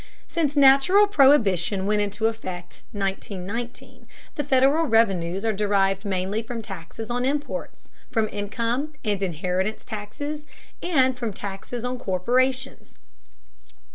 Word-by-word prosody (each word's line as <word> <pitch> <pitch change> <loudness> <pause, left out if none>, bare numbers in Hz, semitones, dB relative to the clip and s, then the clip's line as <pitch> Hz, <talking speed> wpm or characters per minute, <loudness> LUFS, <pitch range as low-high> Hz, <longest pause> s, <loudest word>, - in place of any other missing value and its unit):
Since 300 -3 -1
national 280 +9 +6
prohibition 215 - +3
went 210 +1 +2
into 205 +2 -2
effect 185 -6 -4
(1919), 200 +3 -5 0.3
the 295 - -2
Federal 275 +4 +3
revenues 195 -5 +2
are 220 - +2
derived 195 -1 +1
mainly 195 +2 -1
from 230 0 -6
taxes 200 +4 -7
on 245 +1 0
imports, 290 - -3 0.2
from 220 -1 +1
income 230 +8 -2
and 205 -2 0
inheritance 185 +3 -2
taxes, 260 +8 -5 0.4
and 260 -7 +3
from 230 -4 -2
taxes 200 +5 -6
on 250 0 -3
corporations. 255 +7 0
225 Hz, 115 wpm, -24 LUFS, 195-265 Hz, 0.4 s, national